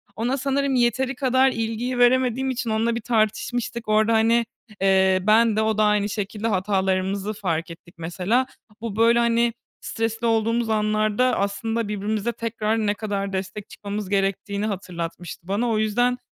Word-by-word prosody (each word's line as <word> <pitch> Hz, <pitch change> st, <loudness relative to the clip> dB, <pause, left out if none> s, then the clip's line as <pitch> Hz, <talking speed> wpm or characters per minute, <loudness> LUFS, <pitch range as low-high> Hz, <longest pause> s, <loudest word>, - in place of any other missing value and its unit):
Ona 245 Hz, +5 st, -1 dB
sanırım 275 Hz, 0 st, 0 dB
yeteri 250 Hz, +2 st, +1 dB
kadar 260 Hz, 0 st, +3 dB
ilgiyi 230 Hz, +2 st, -2 dB
veremediğim 255 Hz, +1 st, +3 dB
için 240 Hz, -2 st, -2 dB
onunla 225 Hz, +2 st, +1 dB
bir 235 Hz, -, -3 dB
tartışmıştık 235 Hz, +1 st, -1 dB
orada, 215 Hz, +1 st, +3 dB
hani, 230 Hz, +1 st, +3 dB, 0.4 s
eee, 190 Hz, -1 st, +4 dB
ben 220 Hz, 0 st, +5 dB
de 220 Hz, -, +2 dB
o 220 Hz, -1 st, 0 dB
da 215 Hz, -, +3 dB
aynı 210 Hz, 0 st, +2 dB
şekilde 210 Hz, +2 st, -3 dB
hatalarımızı 195 Hz, 0 st, 0 dB
fark 170 Hz, -5 st, -3 dB
ettik 170 Hz, +1 st, -14 dB
mesela. 185 Hz, +10 st, 0 dB, 0.3 s
Bu, 225 Hz, -3 st, -4 dB
böyle, 230 Hz, +1 st, +4 dB
hani, 235 Hz, 0 st, +2 dB, 0.3 s
stresli 225 Hz, 0 st, -2 dB
olduğumuz 230 Hz, +1 st, +1 dB
anlarda 215 Hz, +3 st, +1 dB
aslında 220 Hz, +3 st, -1 dB
birbirimize 210 Hz, +2 st, -2 dB
tekrar 225 Hz, -1 st, -2 dB
ne 205 Hz, -, +2 dB
kadar 200 Hz, -2 st, -3 dB
destek 190 Hz, +2 st, -5 dB
çıkmamız 205 Hz, -1 st, -6 dB
gerektiğini 200 Hz, +1 st, -1 dB
hatırlatmıştı 175 Hz, -3 st, -6 dB
bana. 220 Hz, +5 st, 0 dB
O 220 Hz, -, +1 dB
yüzden 245 Hz, +4 st, +1 dB
220 Hz, 150 wpm, -23 LUFS, 200-235 Hz, 0.4 s, ben